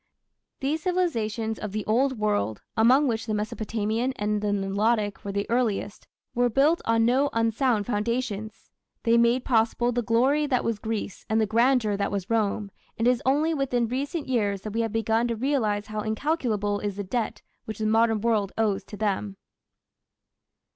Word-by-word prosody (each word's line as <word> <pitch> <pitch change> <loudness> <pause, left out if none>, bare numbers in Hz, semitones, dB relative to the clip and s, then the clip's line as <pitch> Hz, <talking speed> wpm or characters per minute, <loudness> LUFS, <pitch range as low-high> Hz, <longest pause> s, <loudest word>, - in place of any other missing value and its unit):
These 295 +4 -1
civilizations 230 - -1
of 210 -2 -5
the 215 -1 -3
old 260 +4 +1
world, 205 - -1
among 255 +6 +5
which 225 -1 -2
the 215 - 0
Mesopotamian 220 +3 -2
and 210 -1 -1
the 210 - -1
Nilotic 205 +2 0
were 200 - -4
the 200 +1 -2
earliest, 225 -4 -1 0.3
were 245 0 +2
built 285 +8 +3
on 225 0 +3
no 265 +4 +3
unsound 230 -1 +1
foundations. 220 -1 -3 0.3
They 230 -1 +3
made 235 +2 +3
possible 235 0 +2
"the 245 0 0
glory 260 +7 +2
that 255 -3 +1
was 225 -3 -1
Greece 220 -3 -4
and 220 +1 +2
the 220 - +3
grandeur 230 0 +2
that 200 0 -1
was 200 0 -3
Rome", 210 -2 0 0.3
and 230 - +1
it - - +7
is 250 - -1
only 300 +5 +2
within 250 -5 0
recent 280 +6 -3
years 205 -6 0
that 215 0 -6
we 230 - 0
have 225 -1 -1
begun 225 +1 +1
to 235 - -1
realize 220 -5 0
how 215 0 -4
incalculable 215 -4 -1
is 205 -2 -3
the 205 - -4
debt 225 +4 -3 0.2
which 220 -1 -6
the 220 - -2
modern 225 0 +3
world 215 -4 +1
owes 215 -3 +1
to 210 - -9
them. 200 -1 -2
225 Hz, 175 wpm, -26 LUFS, 210-245 Hz, 0.3 s, it